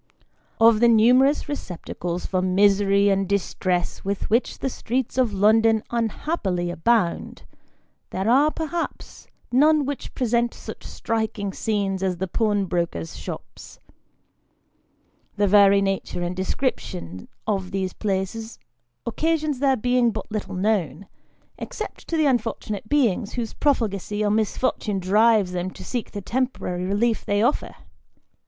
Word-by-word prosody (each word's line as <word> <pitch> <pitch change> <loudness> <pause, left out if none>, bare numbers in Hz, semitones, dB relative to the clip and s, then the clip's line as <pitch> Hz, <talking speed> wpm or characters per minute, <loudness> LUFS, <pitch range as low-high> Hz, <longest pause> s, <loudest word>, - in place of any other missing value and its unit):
OP 225 -1 +6
the 235 - +5
numerous 250 +7 +4
receptacles 180 - -5
for 185 -1 0
misery 200 +1 +3
and 195 -1 +1
distress 185 -2 -1
with 200 +1 -3
which 235 +3 +1
the - - -2
streets 255 -1 -2
of 250 -4 +2
London 220 +2 +3
unhappily 220 - -1
abound, 180 +1 0 0.7
there 190 +2 -3
are, 275 +6 +5
perhaps, 325 +2 -5 0.2
none 295 +3 +4
which 285 0 -5
present 235 -1 0
such - - -9
striking 220 -3 -3
scenes 200 -3 -1
as 185 -2 -1
the 190 +2 -2
pawnbrokers' 180 - -1
shops. - - -9 1.6
The 205 - +2
very 200 0 +6
nature 195 -2 -2
and 175 +1 -3
description 95 - -3 0.2
of 195 -4 -1
these 190 -1 -2
places 210 +3 -3 0.5
occasion 310 +5 0
their 270 -1 +3
being 245 +1 +2
but 225 - -6
little 215 -3 -4
known, 195 -2 0 0.5
except 470 -4 -7
to 330 - -1
the 310 - +3
unfortunate 225 -5 -1
beings 230 -8 +1
whose 235 -3 -3
profligacy 210 -6 0
or 205 - +2
misfor 220 +4 +1
tune 205 -3 -2
drives 205 +1 +3
them 180 0 -2
to - - -11
seek 245 -3 -3
the 205 - -6
temporary 230 -6 -2
relief 215 +4 0
they 205 +1 +1
offer. 245 - 0
210 Hz, 130 wpm, -23 LUFS, 190-240 Hz, 1.6 s, OP